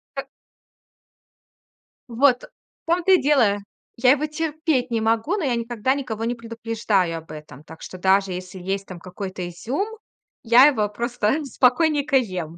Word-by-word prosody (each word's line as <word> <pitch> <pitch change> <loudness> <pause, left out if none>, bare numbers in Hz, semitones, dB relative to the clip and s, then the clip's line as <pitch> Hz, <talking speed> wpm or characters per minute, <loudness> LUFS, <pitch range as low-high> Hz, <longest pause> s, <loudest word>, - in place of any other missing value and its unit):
Как - - -5 1.8
Вот, 250 +1 +3
в - - -20
том-то 360 +2 +3
и 370 - +5
дело. 255 -8 +3 0.4
Я 250 +1 +4
его 290 +2 +2
терпеть 305 -4 -1
не 230 -1 0
могу, 225 - +1
но 385 - -3
я 250 -3 +1
никогда 235 +1 -1
никого 235 -6 -4
не 240 +1 -1
предупреждаю 225 -6 -1
об 160 - -15
этом. 150 -2 -11
Так 160 0 -14
что 185 - -9
даже 190 +1 +2
если 185 +1 -7
есть 195 +2 -3
там 180 -2 -9
какой-то 185 0 -6
изюм, 240 - -3 0.6
я 240 +2 +7
его 220 -8 +2
просто 235 +5 -1
спокойненько 280 +2 +2
ем. 180 -9 -3
230 Hz, 155 wpm, -22 LUFS, 195-275 Hz, 1.8 s, я